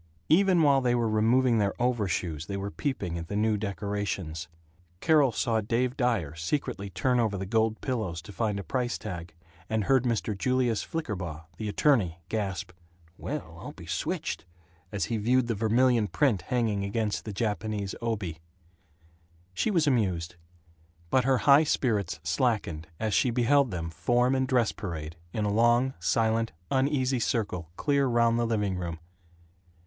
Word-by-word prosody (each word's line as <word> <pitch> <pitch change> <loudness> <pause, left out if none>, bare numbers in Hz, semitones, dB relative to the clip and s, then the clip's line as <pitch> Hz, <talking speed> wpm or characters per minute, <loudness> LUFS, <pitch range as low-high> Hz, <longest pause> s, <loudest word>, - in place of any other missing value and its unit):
Even 180 0 +5
while 140 -2 +5
they 120 -1 +2
were 120 -1 +1
removing 115 +2 +3
their 100 -1 0
overshoes 95 -9 -1
they 100 - -3
were 100 +1 -4
peeping 100 - -3
at 85 - -7
the 100 - -4
new 110 +1 +2
decorations. 100 -4 -3 0.5
Carol 150 - +4
saw 110 0 0
Dave 120 +4 0
Dyer 115 - 0
secretively 100 - -3
turn 125 +8 +1
over 110 -4 +1
the 95 - -4
gold 110 +2 +1
pillows 110 -10 -2
to - - -10
find 105 -1 -1
a - - -5
price 120 +3 -1
tag, 85 -5 -7 0.3
and 110 -1 0
heard 130 +2 +3
Mr. 110 -4 0
Julius 125 +1 +1
Flickerbaugh, 90 - -4
the 110 +1 -3
attorney, 100 - +2
gasp, 100 -4 -3 0.4
"Well, - - -6
I'll - - -7
be - - -12
switched," - - -3 0.5
as 100 - -1
he 115 - -2
viewed 125 +4 +2
the 120 - -1
vermilion 115 +1 +3
print 120 -5 +1
hanging 115 -5 0
against 105 +1 -1
the 110 - -5
Japanese 105 -1 -2
obi. 105 -9 -3 1.1
She 155 - 0
was 170 -7 +2
amused. 95 - 0 0.8
But 130 -1 +3
her 135 -1 +4
high 140 +2 +7
spirits 105 - 0
slackened 80 -3 0
as 110 -2 -1
she 125 - +3
beheld 130 +3 +3
them 85 -4 -4
form 120 +9 +2
in 130 0 +1
dress 125 -4 +2
parade, 85 -6 -6 0.2
in 105 +3 -1
a 100 - 0
long, 120 +4 +3
silent, 115 +4 +1 0.2
uneasy 135 -1 +1
circle 100 -8 -1
clear 140 -2 +2
round 115 -1 +3
the 120 - +1
living 105 -4 0
room. 85 -2 -4
110 Hz, 160 wpm, -28 LUFS, 100-125 Hz, 1.1 s, high